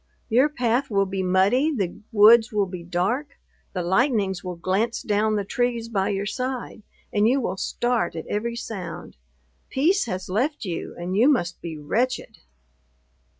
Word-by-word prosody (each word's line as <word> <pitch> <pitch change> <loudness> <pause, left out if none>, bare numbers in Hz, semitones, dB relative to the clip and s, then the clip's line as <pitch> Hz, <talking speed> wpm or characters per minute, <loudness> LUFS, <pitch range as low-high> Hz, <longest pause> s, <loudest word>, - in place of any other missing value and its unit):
Your 255 +6 +4
path 250 0 0
will 200 -2 +2
be 195 0 -3
muddy; 195 +11 +3
the 195 - -1 0.2
woods 225 +2 +7
will 205 -2 +1
be 180 -2 -7
dark; 195 - -2 0.4
the 180 - -2
lightnings 195 -1 +1
will 180 -1 -5
glance 190 +7 -1
down 215 +1 +1
the 205 -1 -1
trees 235 +1 -1
by 200 -3 0
your 200 0 -1
side, 255 +1 -4 0.3
and 210 +1 +3
you 260 +4 +3
will 195 -7 -2
start 240 0 -1
at 160 - -5
every 235 +3 -2
sound! 180 -8 -7 0.5
peace 340 +9 +2
has 185 -4 -4
left 245 +8 -1
you, 175 -3 -5
and 175 +2 -3
you 235 +8 +5
must 175 -12 0
be 165 -2 -6
wretched. 235 - -2
210 Hz, 160 wpm, -24 LUFS, 185-245 Hz, 0.5 s, woods